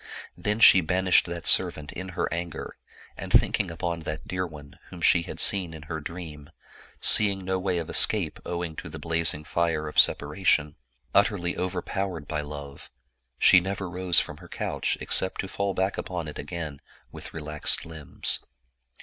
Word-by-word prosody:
Then 105 +5 -2
she 95 -4 +8
banished 90 +3 +2
that 85 0 -6
servant 75 0 +4
in 95 +1 -7
her - - 0
anger, 85 -1 -6 0.4
and - - -8
thinking 100 - +3
upon 85 0 -4
that 80 -1 -7
dear 90 0 -3
one, 75 -3 -14
whom 90 - -11
she 85 +1 +4
had - - -8
seen 90 -5 +4
in 80 - -10
her 80 +1 -5
dream, 75 -2 -9 0.5
seeing 100 -3 +4
no 95 0 -1
way 90 -1 -1
of 85 -2 -4
escape - - +1
owing 85 -2 -5
to - - -7
the 80 - -8
blazing 80 -1 0
fire 80 -1 -1
of 75 - 0
separation, 75 +1 +2 0.4
utterly 100 -3 +1
overpowered 90 -2 -4
by 75 -1 -3
love, 70 -1 -9 0.5
she 90 - +6
never 95 +1 -4
rose 90 0 +4
from - - -5
her - - -15
couch - - -2
except 95 - +1
to 95 - -7
fall 100 0 -3
back 95 +1 -1
upon 85 -4 -5
it 75 - -8
again 75 -2 -6 0.3
with - - -9
relaxed 75 -1 -1
limbs. 80 -3 -1
85 Hz, 165 wpm, -26 LUFS, 75-95 Hz, 0.5 s, she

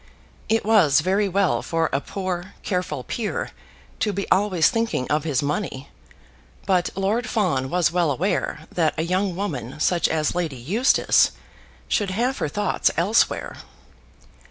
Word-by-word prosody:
It 225 -1 +1
was 180 -11 +5
very 195 +4 +1
well 195 0 +1
for 165 -1 0
a 135 - +1
poor, 185 0 -5
careful 180 -8 -2
peer 220 - -3 0.5
to 215 - +1
be 200 0 -3
always 185 -5 +3
thinking 225 - 0
of 150 +1 +1
his 145 -4 0
money, 140 -3 -3 0.8
but 180 -2 +2
Lord 210 +6 0
Fawn 160 - 0
was 175 -1 +2
well 175 -2 +1
aware 150 +1 -1
that 160 -3 +1
a 160 - 0
young 185 +2 0
woman 145 - -4
such 175 +2 +2
as 155 -1 0
Lady 165 -6 -2
Eustace 205 - +3 0.5
should 205 -2 0
have 240 +8 -1
her - - -1
thoughts 205 +5 +1
elsewhere. 195 +7 +1
180 Hz, 145 wpm, -23 LUFS, 155-205 Hz, 0.8 s, was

